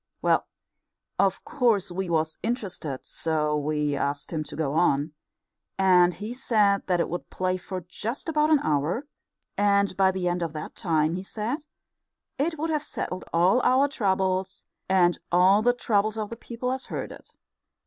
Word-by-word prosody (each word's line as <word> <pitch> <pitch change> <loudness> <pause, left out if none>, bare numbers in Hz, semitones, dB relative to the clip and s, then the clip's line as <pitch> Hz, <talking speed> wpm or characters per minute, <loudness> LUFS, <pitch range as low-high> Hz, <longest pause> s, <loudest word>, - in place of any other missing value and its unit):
Well, - - +2 0.7
of - - +1
course 225 -8 +1
we 185 0 -3
was 160 -1 0
interested, 195 - -4
so 150 -2 0
we 150 0 0
asked 140 +1 -2
him 155 -1 -1
to - - -9
go 145 -3 -1
on, 150 -2 +2 0.6
and 180 -2 +5
he 215 +3 -5
said 210 -6 +2
that 180 -2 +2
it - - +1
would 175 - -5
play 185 0 -1
for 185 0 -6
just 210 - -6
about 305 -1 +2
an 310 -2 +5
hour, 155 - 0 0.5
and 200 -1 +3
by 190 0 +4
the 185 -1 -1
end 175 0 0
of 165 -2 -2
that 155 -1 -6
time, 160 -2 +1
he - - -4
said, 235 - -4 0.7
it 320 +3 0
would 320 +2 -2
have 305 -1 +1
settled 185 -9 -5
all 180 +9 +4
our 260 +3 +4
troubles 190 -5 -1 0.2
and 180 -2 +3
all 185 +4 +5
the 245 +2 +4
troubles 215 -3 0
of 215 0 -3
the - - -4
people 235 +2 -4
as 260 0 -4
heard - - -4
it. - - -13
190 Hz, 170 wpm, -26 LUFS, 165-230 Hz, 0.7 s, and